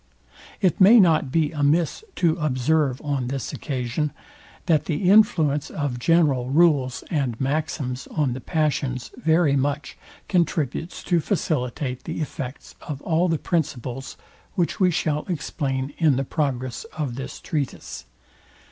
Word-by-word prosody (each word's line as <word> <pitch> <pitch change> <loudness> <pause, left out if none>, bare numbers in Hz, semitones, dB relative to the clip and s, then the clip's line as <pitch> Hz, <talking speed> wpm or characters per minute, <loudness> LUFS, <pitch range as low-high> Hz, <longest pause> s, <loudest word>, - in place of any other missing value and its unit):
It 190 +2 +2
may 220 +5 +9
not 160 -8 +4
be 155 -1 +2
amiss 155 - +1
to 165 -3 +2
observe 145 -2 +1
on 140 -4 -1
this 135 0 -4
occasion, 135 +2 -2 0.5
that 155 -3 +2
the 180 +4 +1
influence 160 -8 +4
of 140 -5 -3
general 140 -4 +2
rules 140 -4 +3
and 135 -8 -1
maxims 135 -2 -2
on 145 -5 0
the 130 - -6
passions 135 -6 -1
very 160 -2 +3
much 140 +2 -1 0.3
contributes 165 -2 -1
to 175 -2 +2
facilitate 140 - -2
the 165 - -4
effects 135 -3 -6
of 145 -4 -6
all 170 +2 +2
the 165 - +1
principles, 135 -6 -3 0.4
which 175 -2 0
we 185 -2 +5
shall 155 -3 0
explain 140 -5 -2
in 155 -5 +4
the 135 +2 -1
progress 130 -5 -2
of 145 -6 -2
this 135 +2 -6
treatise. 145 -5 -4
150 Hz, 135 wpm, -24 LUFS, 130-165 Hz, 0.5 s, may